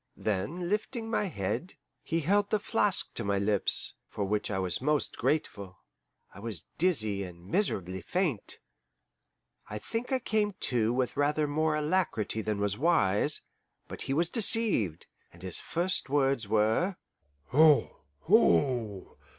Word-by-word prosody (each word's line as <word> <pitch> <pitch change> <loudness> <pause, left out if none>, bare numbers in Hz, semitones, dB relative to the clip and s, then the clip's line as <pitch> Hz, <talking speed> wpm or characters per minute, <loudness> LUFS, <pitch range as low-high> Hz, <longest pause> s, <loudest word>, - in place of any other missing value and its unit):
Then, 110 - -2
lifting 225 +3 -2
my 210 - +1
head, 115 - -4 0.3
he 165 0 -2
held 200 +6 +1
the 215 - +2
flask 205 -1 0
to 115 - -4
my 100 -1 0
lips; 100 0 +2 0.2
for 105 - -4
which 105 +2 -1
I 100 - -2
was 95 +2 -1
most 150 +2 0
grateful 105 -9 -2 0.6
I 95 - -12
was 105 -6 -5 0.2
dizzy 110 - +2
and 90 -2 -11
miserably 95 - -1
faint. 165 - -2 1.1
I 105 - -5
think 230 - -5
I 265 - +3
came 215 -4 -1
to 115 -3 +1
with 125 0 -1
rather 150 +1 +1
more 155 +1 0
alacrity 150 - -1
than 105 -1 -2
was 100 0 -1
wise, 145 - +2 0.5
but - - -8
he 135 - -2
was 170 +3 +2
deceived, 205 - +2 0.3
and 85 +1 -16
his 95 -3 +3
first 175 -2 -1
words 135 -5 +1
were, 110 - +1 0.5
"Ho, 150 +2 +4 0.2
ho! 105 +1 +2
135 Hz, 140 wpm, -29 LUFS, -, 1.1 s, Ho